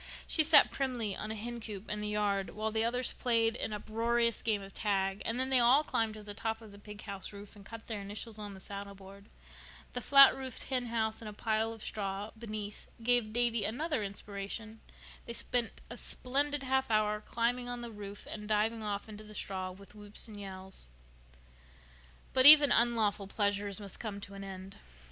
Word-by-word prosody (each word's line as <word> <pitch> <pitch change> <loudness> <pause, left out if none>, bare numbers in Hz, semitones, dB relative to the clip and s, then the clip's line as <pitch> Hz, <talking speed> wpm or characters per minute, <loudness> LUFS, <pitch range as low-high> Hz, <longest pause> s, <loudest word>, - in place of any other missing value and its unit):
She 315 - +4
sat 305 -1 +7
primly 245 -7 -2
on 215 - -5
a 220 - -3
hencoop 220 -2 -6
in 210 0 -3
the 210 - -2
yard 200 -4 -1
while 215 +1 -2
the 220 0 +1
others 245 +2 0
played 230 -2 +1
an - - -3
uproarious 230 +2 0
game 210 -3 0
of 195 - -11
tag; 195 -2 0
and 230 +2 -1
then 260 +1 -1
they 260 - +6
all 250 +5 +6
climbed 225 -6 -1
to 215 - -10
the 205 0 -8
top 225 +2 -3
of 220 -2 -13
the 200 - -13
pig 210 0 -10
house 200 -2 -6
roof 205 +1 -11
and 205 - -13
cut 225 +2 -10
their 215 -3 -4
initials 210 +2 -6
on 205 -1 -7
the - - -11
saddleboard. 200 0 -9 0.7
The 245 - -2
flat 275 +3 +8
roofed 260 -2 -6
henhouse 230 -3 -1
and 220 - -6
a - - -9
pile 220 +1 0
of 225 -1 -9
straw 200 0 -3
beneath 215 -2 -7 0.2
gave 240 -2 +2
Davy 235 -1 +1
another 295 +5 -1
inspiration. 200 +2 -5 0.5
They 235 - -5
spent 235 -2 -2
a 240 - -9
splendid 280 +4 -1
half 265 -1 +1
hour 210 -1 +2
climbing 245 +2 -1
on 245 0 -4
the 235 -1 -6
roof 205 -1 -8
and 210 0 -7
diving 220 +2 +1
off 205 -1 -3
into 215 0 -9
the 215 0 -11
straw 190 -1 -3
with 195 +2 -13
whoops 205 +1 -3
and 210 -2 -10
yells. 190 - -9 1.5
But 260 +1 +8
even 290 -2 +11
unlawful 220 -4 +2
pleasures 200 -1 -1
must 200 -2 -6
come 210 -3 -5
to 200 - -8
an 195 0 -7
end. 190 0 -9
215 Hz, 195 wpm, -32 LUFS, 200-235 Hz, 1.5 s, even